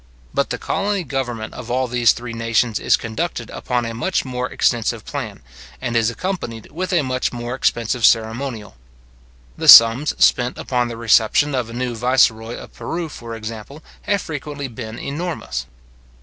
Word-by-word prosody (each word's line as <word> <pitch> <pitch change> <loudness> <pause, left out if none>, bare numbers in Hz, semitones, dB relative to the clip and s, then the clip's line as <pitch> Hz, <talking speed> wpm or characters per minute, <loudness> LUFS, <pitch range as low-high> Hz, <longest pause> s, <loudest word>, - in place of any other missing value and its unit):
But - - 0
the - - -2
colony 200 -1 -1
government 125 -6 -4
of 120 - -9
all 130 +1 0
these 120 -1 +4
three 120 -1 -6
nations 115 -1 0
is - - +3
conducted 115 +1 -4
upon 125 -1 -2
a 115 - -4
much 130 +11 -1
more 125 -1 -3
extensive 115 -3 0
plan, - - -6 0.4
and 120 -1 -3
is 115 -1 +3
accompanied 120 - -5
with 185 +4 -4
a 170 -5 +2
much 130 -1 -1
more 120 0 -5
expensive 120 -2 0
ceremonial. 115 - +1 0.8
The - - -2
sums 115 +6 +9
spent 125 0 +3
upon 125 -1 -1
the 115 -1 -6
reception 115 +5 +3
of 125 -3 -1
a - - -9
new 125 0 -2
viceroy 115 -1 +2
of - - -11
Peru, 170 -1 -4
for 115 -4 -8
example, 115 +6 -8 0.2
have 200 -1 +1
frequently 145 -2 -5
been 115 -2 -8
enormous. 140 - -4
120 Hz, 165 wpm, -20 LUFS, 115-140 Hz, 0.8 s, sums